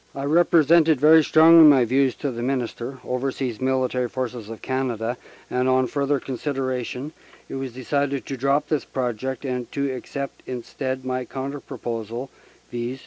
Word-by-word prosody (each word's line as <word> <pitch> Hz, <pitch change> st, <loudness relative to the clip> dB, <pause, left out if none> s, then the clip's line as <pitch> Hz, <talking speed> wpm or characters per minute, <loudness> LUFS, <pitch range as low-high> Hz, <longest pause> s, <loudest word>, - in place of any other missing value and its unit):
"I 135 Hz, -, -4 dB
represented 160 Hz, -1 st, +4 dB
very 155 Hz, +2 st, +7 dB
strongly 160 Hz, +2 st, +7 dB
my 140 Hz, -5 st, +7 dB
views 130 Hz, +2 st, +2 dB
to 140 Hz, -, -3 dB
the 120 Hz, -1 st, -5 dB
Minister, 125 Hz, 0 st, -3 dB
Overseas 125 Hz, -2 st, -3 dB
Military 130 Hz, -1 st, 0 dB
Forces 125 Hz, -4 st, -5 dB
of 115 Hz, -, -9 dB
Canada, 125 Hz, -3 st, -2 dB, 0.3 s
and, 125 Hz, +1 st, 0 dB
on 130 Hz, 0 st, +3 dB
further 140 Hz, +2 st, 0 dB
consider 135 Hz, 0 st, -3 dB
ation, 125 Hz, +4 st, -4 dB, 0.3 s
it -, -, -9 dB
was 135 Hz, -2 st, -4 dB
decided 140 Hz, +2 st, -1 dB
to 135 Hz, -, -4 dB
drop 140 Hz, +3 st, +1 dB
this 155 Hz, -3 st, 0 dB
project 130 Hz, +1 st, -3 dB
and 125 Hz, -2 st, -3 dB
to 140 Hz, -1 st, -1 dB
accept 140 Hz, +2 st, -6 dB
instead 130 Hz, +1 st, -4 dB
my 130 Hz, 0 st, -2 dB
counter 140 Hz, +2 st, -5 dB
proposal, 115 Hz, +1 st, -6 dB, 0.4 s
viz. 120 Hz, +2 st, -4 dB
130 Hz, 155 wpm, -23 LUFS, 125-140 Hz, 0.4 s, very